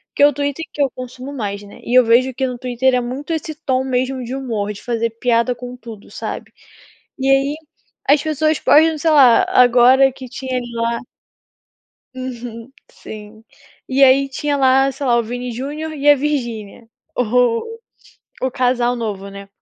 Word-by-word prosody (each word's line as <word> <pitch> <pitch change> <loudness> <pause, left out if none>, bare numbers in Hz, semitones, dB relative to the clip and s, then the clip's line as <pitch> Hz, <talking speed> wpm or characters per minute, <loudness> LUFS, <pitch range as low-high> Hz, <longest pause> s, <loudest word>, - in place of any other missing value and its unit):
que 285 - +6
o 290 - +4
Twitter, 285 +3 -3
que 290 - -3
eu 275 - +3
consumo 255 +2 -8
mais, 205 -6 -4
né, 205 0 -14
e 240 - -4
eu 255 - +7
vejo 245 +3 +3
que 265 +2 -1
no 250 -1 -5
Twitter 255 +1 0
é 250 - +1
muito 260 +6 -6
esse 315 0 -4
tom 265 -4 -1
mesmo 260 0 -2
de 245 +3 -5
humor 220 -6 -3
de 200 - -12
fazer 230 -1 -2
piada 235 +1 +1
com 245 0 -9
tudo, 225 -3 -12
sabe. - - -6 0.7
E 270 +1 0
aí, 275 +2 +2 0.5
as 285 +1 +4
pessoas 310 0 0
postam, 315 0 +4
sei 325 +2 +1
lá 270 -6 +6
agora 250 +2 +5
que 260 -1 -10
tinha 255 +1 -4 0.2
lá 230 0 -1 1.1
Uhum, 245 -2 -7 0.2
sim. 215 +1 -11 0.5
E 270 +1 +4
aí 270 +1 +4
tinha 285 +2 -2
lá, 270 0 +3
sei 275 0 -5
lá, 240 - +3
o 235 - +2
Vini 245 +2 -5
Júnior 290 +6 -5
e 290 0 +3
a - - +8
Virgínia 240 -7 -4 0.3
o 250 - 0 0.6
o 260 - 0
casal 245 -1 +1
novo, 205 -4 -5
né. 200 0 -10
255 Hz, 175 wpm, -18 LUFS, 235-275 Hz, 1.1 s, a